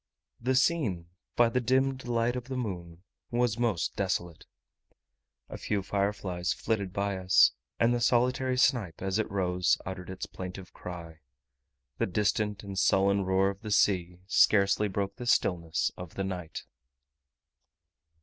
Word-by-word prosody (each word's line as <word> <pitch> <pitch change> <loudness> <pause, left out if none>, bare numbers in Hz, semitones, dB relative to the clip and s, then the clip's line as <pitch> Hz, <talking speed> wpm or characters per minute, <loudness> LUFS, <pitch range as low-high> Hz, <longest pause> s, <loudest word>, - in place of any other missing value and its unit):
The 130 +2 0
scene 125 - +1 0.3
by 120 -1 +5
the 125 +2 0
dimmed 130 +1 +1
light 120 0 +1
of 125 -1 -4
the 130 0 -5
moon 90 -7 -5 0.3
was 120 -1 0
most 110 -10 0
desolate. 85 -2 -2 1.0
A - - -8
few 100 -2 -1
fireflies 95 -3 -1
flitted 100 -4 -2
by 100 0 -1
us; 95 0 +5 0.3
and 115 +1 +4
the 120 - -1
solitary 125 +2 +2
snipe, 115 - +1
as 95 +2 0
it 110 - -1
rose, 90 -3 +1
uttered 90 -1 -6
its 95 0 -5
plaintive 90 0 -8
cry. 85 -2 -8 0.8
The - - +1
distant 105 +1 0
and 100 -2 -4
sullen 100 0 +3
roar 95 +1 +2
of 100 - -13
the 110 - -6
sea 90 -4 +2
scarcely 100 +1 +4
broke 100 0 -3
the 120 - -6
stillness 85 -6 +1
of 90 -3 -9
the 95 - -2
night. 90 -4 -5
100 Hz, 145 wpm, -29 LUFS, 90-120 Hz, 1.0 s, by